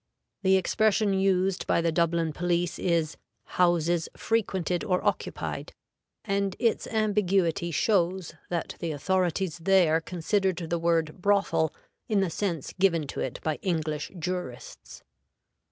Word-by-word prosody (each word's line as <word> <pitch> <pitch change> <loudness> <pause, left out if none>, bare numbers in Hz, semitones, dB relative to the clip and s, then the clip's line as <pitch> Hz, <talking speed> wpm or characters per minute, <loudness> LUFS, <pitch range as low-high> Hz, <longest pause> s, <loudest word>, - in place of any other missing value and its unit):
The 190 -1 +4
expression 215 +1 +2
used 190 -1 +1
by - - +3
the 165 0 +1
Dublin 165 -1 +1
police 175 +1 -1
is 165 -3 0 0.4
"houses 175 -1 +2
frequented 190 -6 0
or 180 -1 0
occupied," - - -2 0.5
and 200 -2 0
its 230 -2 +1
ambiguity 195 -6 +1
shows 180 -1 +1 0.2
that 170 -2 -3
the 165 -2 -2
authorities 180 +2 0
there 165 -2 +4
considered 185 +2 0
the 170 - +1
word 165 0 0
"brothel" 200 -5 +2 0.4
in 210 -2 +3
the 190 -3 0
sense 170 -6 -3
given 170 -5 +3
to - - -5
it - - -3
by 155 -2 -1
English 155 -4 -2
jurists. 175 -8 -6
180 Hz, 125 wpm, -27 LUFS, 165-195 Hz, 0.5 s, The